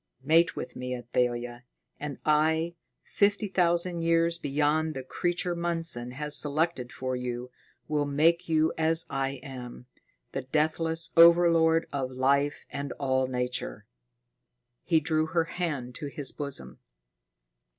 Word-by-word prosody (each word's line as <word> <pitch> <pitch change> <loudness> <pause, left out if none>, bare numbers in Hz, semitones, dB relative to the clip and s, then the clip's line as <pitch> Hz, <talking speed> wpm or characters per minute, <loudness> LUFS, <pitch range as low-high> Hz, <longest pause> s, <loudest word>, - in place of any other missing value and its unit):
Mate 165 +4 +3
with - - -6
me, 125 0 -4
Athalia, 120 0 -2 0.4
and 145 -2 -5
I, 160 +2 +2 0.3
fifty 205 +1 +1
thousand 175 -2 +1
years 165 0 +2
beyond 150 +2 0
the 130 - -5
creature 175 +5 -2
Mundson 165 -8 -3
has 150 +2 +3
selected 150 -4 +1
for 130 0 -3
you, 125 0 -5 0.4
will 150 -1 0
make 165 +5 +2
you 160 0 +2
as 160 +1 +2
I 135 0 -1
am, 125 -2 -9 0.5
the 135 - -3
deathless 160 +4 0
overlord 165 -1 +6
of 135 -2 -2
life 140 +3 +1
and 140 -1 -4
all 130 -1 0
nature." 125 - -3 1.0
He 165 -2 +2
drew 155 +1 0
her 165 0 +1
hand 160 -8 -4
to 145 - -5
his 140 -1 0
bosom. 130 - -5
150 Hz, 130 wpm, -28 LUFS, 130-165 Hz, 1.0 s, overlord